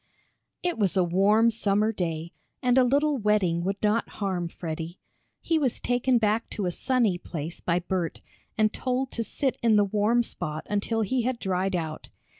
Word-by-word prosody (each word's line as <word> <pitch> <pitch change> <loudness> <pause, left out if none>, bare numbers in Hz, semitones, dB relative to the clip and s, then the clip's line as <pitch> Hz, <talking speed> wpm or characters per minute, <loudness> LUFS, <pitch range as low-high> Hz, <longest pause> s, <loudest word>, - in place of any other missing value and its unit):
It 350 -8 -1
was 195 -2 +1
a 185 - +5
warm 205 +6 +4
summer 215 -1 +1
day 170 -4 -3 0.3
and 250 -1 +3
a 260 - +6
little 285 +3 +2
wetting 200 -6 +2
would 195 +2 -1
not 215 +2 +2
harm 185 -4 -1
Freddie. 165 +1 -6 0.4
He 325 -1 +1
was 260 -5 0
taken 245 +1 +2
back 220 0 +1
to 205 - -1
a 180 - 0
sunny 225 -3 +1
place 165 -1 -6
by 170 -1 +1
Bert, 175 -1 -2 0.4
and 215 0 +3
told 255 0 -1
to 230 - -2
sit 265 +5 -1
in 230 -2 +4
the 205 -1 +5
warm 215 +4 +2
spot 155 -8 -5
until 205 +2 0
he 250 +4 +1
had 250 +1 -1
dried 190 -1 -1
out. 160 -3 -4
210 Hz, 180 wpm, -27 LUFS, 180-235 Hz, 0.4 s, a